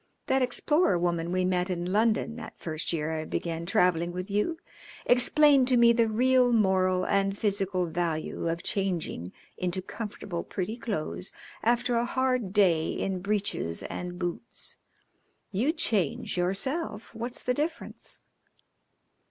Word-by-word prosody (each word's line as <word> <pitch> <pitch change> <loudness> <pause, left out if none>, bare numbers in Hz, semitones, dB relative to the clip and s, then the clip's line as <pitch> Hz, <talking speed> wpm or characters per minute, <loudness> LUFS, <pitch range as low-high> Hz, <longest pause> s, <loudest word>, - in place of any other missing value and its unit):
That 265 0 +2
explorer 255 - +2
woman 170 -1 -1
we 185 0 +1
met 180 0 +1
in 175 0 -2
London 225 +1 +2
that - - -9
first 155 -1 -3
year 160 -1 -1
I 160 -1 -2
began 165 +1 -3
travelling 175 -1 +2
with 180 +3 -5
you 210 +12 0 0.5
explained 265 +2 +5
to 255 -1 +4
me 235 0 +7
the 230 -1 +3
real 250 +2 +4
moral 185 -4 +3
and 195 0 +1
physical 195 -3 0
value 165 -1 -2
of 170 +1 -3
changing 175 - -2 0.3
into 180 0 -2
comfortable, 195 -3 -5
pretty 200 +3 -4
clothes 195 -5 -4 0.3
after 240 +1 +2
a 235 - +1
hard 255 -5 0
day 175 -6 +3
in 190 -1 -2
breeches 200 - -2
and 180 0 -5
boots. 175 +5 -5 0.7
You 225 +10 +1
change 230 - 0
yourself. 210 - -2
What's 235 +2 -4
the 250 - +1
difference?" 310 +5 -4
195 Hz, 135 wpm, -28 LUFS, 175-240 Hz, 0.7 s, me